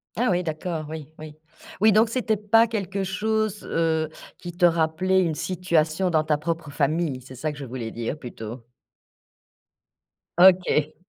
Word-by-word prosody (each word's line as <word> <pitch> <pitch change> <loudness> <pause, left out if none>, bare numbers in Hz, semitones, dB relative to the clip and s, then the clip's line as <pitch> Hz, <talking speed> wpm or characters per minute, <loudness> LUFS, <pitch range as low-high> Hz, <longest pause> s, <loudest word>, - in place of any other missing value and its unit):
Ah, 245 0 +1
oui, 180 0 +1
d'accord, 160 0 -4
oui, 155 -3 -7
oui. 155 -1 -9 0.5
Oui 215 0 +6
donc 220 +2 +4
c'était 230 -3 0
pas 225 +3 +4
quelque 195 -3 -3
chose, 215 +2 -1
heu, 160 -1 0 0.3
qui 175 - -8
te 175 0 +3
rappelait 170 +3 +2
une 160 -3 -1
situation 175 -1 0
dans 155 -2 +2
ta 150 -1 +1
propre 165 0 -4
famille? 145 -2 0
C'est 130 +1 -12
ça 155 +5 -3
que 150 - -10
je 140 - -6
voulais 120 -2 -6
dire 120 +5 -4
plutôt. 115 -2 -8 1.7
OK. 180 -4 +4
165 Hz, 155 wpm, -24 LUFS, 150-190 Hz, 1.7 s, Oui